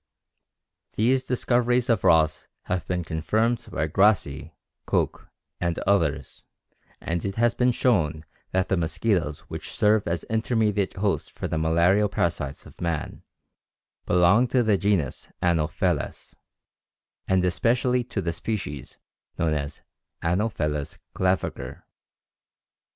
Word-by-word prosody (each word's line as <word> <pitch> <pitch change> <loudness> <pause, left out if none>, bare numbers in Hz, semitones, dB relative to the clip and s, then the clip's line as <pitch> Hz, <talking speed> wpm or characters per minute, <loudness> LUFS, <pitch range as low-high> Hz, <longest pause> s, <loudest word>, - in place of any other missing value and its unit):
These 130 +4 +2
discoveries 125 -1 +1
of 115 -5 +1
Ross 80 -1 +3 0.2
have 90 -1 -3
been 90 -1 -1
confirmed 110 +9 0
by 80 - -1
Grassi, 80 -5 +2 0.4
Koch - - -1 0.3
and 85 -1 -1
others, 80 -9 0 0.6
and 85 +1 -3
it 100 -1 -3
has 120 +1 +3
been 125 0 +2
shown 80 - +1 0.2
that 95 +1 0
the 95 - +2
mosquitoes 85 -2 0
which 80 -1 -8
serve 105 +2 +2
as 85 0 -1
intermediate 110 -3 0
host 100 +1 -1
for - - -5
the 80 - -2
malarial 85 +6 +3
parasites 80 -8 -2
of - - -15
man 85 -3 -3 0.9
belong 90 +8 +4
to 125 0 +2
the 110 -2 +3
genus 95 -8 0
Anopheles, 85 -1 -1 0.9
and 95 -1 +2
especially 125 +6 +1
to 110 -5 -3
the 85 0 -1
species 80 - -5 0.4
known 80 -2 +1
as 75 0 -4 0.4
Anopheles 80 -6 -1 0.2
claviger. 95 0 -1
90 Hz, 120 wpm, -25 LUFS, 80-110 Hz, 0.9 s, belong